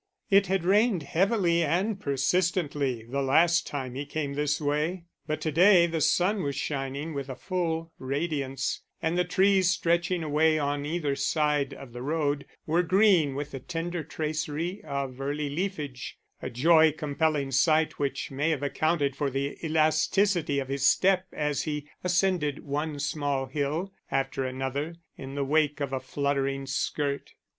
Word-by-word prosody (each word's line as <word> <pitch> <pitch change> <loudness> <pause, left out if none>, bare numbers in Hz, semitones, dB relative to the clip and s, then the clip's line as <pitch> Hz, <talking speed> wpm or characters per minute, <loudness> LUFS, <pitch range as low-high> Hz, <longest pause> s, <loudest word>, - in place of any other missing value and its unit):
It 195 0 +5
had 190 -2 0
rained 205 -2 +3
heavily 175 +1 +2
and 190 +7 0
persistently 140 -3 0
the 135 +5 -3
last 165 +6 +3
time 130 -4 -4
he 135 +3 -4
came 145 -1 -3
this 150 +2 0
way, 155 +4 -1 0.2
but 155 0 -2
to 155 - -1
day 175 +2 +6
the 165 -2 -2
sun 185 +7 +2
was 140 -4 -2
shining 140 +2 -3
with 140 -1 -5
a 130 - -4
full 165 -2 -2
radiance, 135 -1 -2 0.2
and 160 +1 -1
the 180 - +3
trees 190 +1 +3
stretching 175 -1 +1
away 155 +1 +3
on 145 -1 -1
either 150 -3 -1
side 150 0 0
of 125 -4 -11
the 120 - -7
road 145 -1 -1 0.2
were 165 +3 +2
green 180 -5 +4
with 145 +1 -4
the 135 - -5
tender 170 +3 -4
tracery 155 +4 -3
of 140 -3 -4
early 145 +1 -2
leafage; 150 -7 -4 0.2
a - - -4
joy 160 +5 +5
compelling 150 -2 -1
sight 155 +4 +2
which 140 -1 -2
may 145 +4 0
have 150 -4 -1
accounted 145 -1 0
for 145 -1 -1
the 135 +1 -2
elasticity 160 +1 +2
of 135 -1 -1
his 140 0 +1
step 190 -1 +3
as 150 -1 -1
he 150 -2 -4 0.2
ascended 180 -5 +1
one 145 +1 -2
small 145 -2 -1
hill 150 +8 -2 0.2
after 135 0 -1
another 135 +5 -3 0.2
in 135 0 -8
the 140 -1 -1
wake 150 +1 +2
of 140 -2 -3
a 135 - 0
fluttering 135 0 -1
skirt. 140 +1 -2
150 Hz, 160 wpm, -27 LUFS, 140-170 Hz, 0.2 s, day